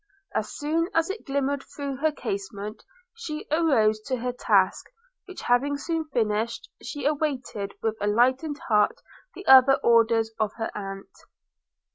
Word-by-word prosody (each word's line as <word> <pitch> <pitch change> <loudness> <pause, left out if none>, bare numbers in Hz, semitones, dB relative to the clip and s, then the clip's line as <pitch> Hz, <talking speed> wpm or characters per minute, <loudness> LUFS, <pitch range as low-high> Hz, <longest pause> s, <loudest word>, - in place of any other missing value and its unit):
As - - -2
soon 325 +4 -1
as 330 +3 +2
it 420 -3 -9
glimmered 280 0 0
through 280 -2 -6
her 310 +3 +1
casement, 200 -3 -5 0.3
she 335 -10 -6
arose 260 -10 +3
to 260 - 0
her 245 +1 -3
task; 250 - +2 0.4
which 375 - -9
having 275 +4 +2
soon 325 +2 -2
finished, 225 -4 -1
she 275 +3 -6
awaited 280 -9 -2
with 220 -1 0
a 205 - 0
lightened 260 +7 +2
heart 210 -2 +3 0.4
the 385 - -9
other 265 0 +8
orders 230 -1 +4
of 215 -1 0
her 225 -1 -3
aunt. 195 -1 -7
260 Hz, 145 wpm, -26 LUFS, 220-300 Hz, 0.4 s, other